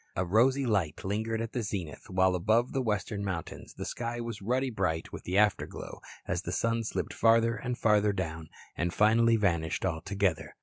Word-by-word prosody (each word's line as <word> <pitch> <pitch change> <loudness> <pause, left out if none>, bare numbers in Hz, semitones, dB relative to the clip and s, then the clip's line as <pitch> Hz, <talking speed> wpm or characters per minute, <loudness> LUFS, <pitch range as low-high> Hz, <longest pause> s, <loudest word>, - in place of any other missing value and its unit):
A 90 - 0
rosy 130 +9 +3
light 95 -10 0
lingered 110 +3 -1
at 115 0 -5
the 125 - -1
zenith, 95 -7 -5
while 95 0 +3
above 110 +7 +2
the 135 - +1
western 105 -3 -2
mountains 90 -5 -5
the - - -5
sky 120 0 -4
was 115 -3 -5
ruddy 125 +5 0
bright 90 -7 -2
with - - -8
the 90 +2 0
afterglow 105 -1 0 0.3
as - - -1
the - - -5
sun 115 0 0
slipped 110 - -3
farther 115 0 +4
and 125 +1 -4
farther 105 -2 +3
down 80 -5 -4 0.3
and 85 0 -1
finally 115 +2 +4
vanished 85 -7 0
altogether. 95 +1 -1
105 Hz, 180 wpm, -30 LUFS, 95-115 Hz, 0.3 s, farther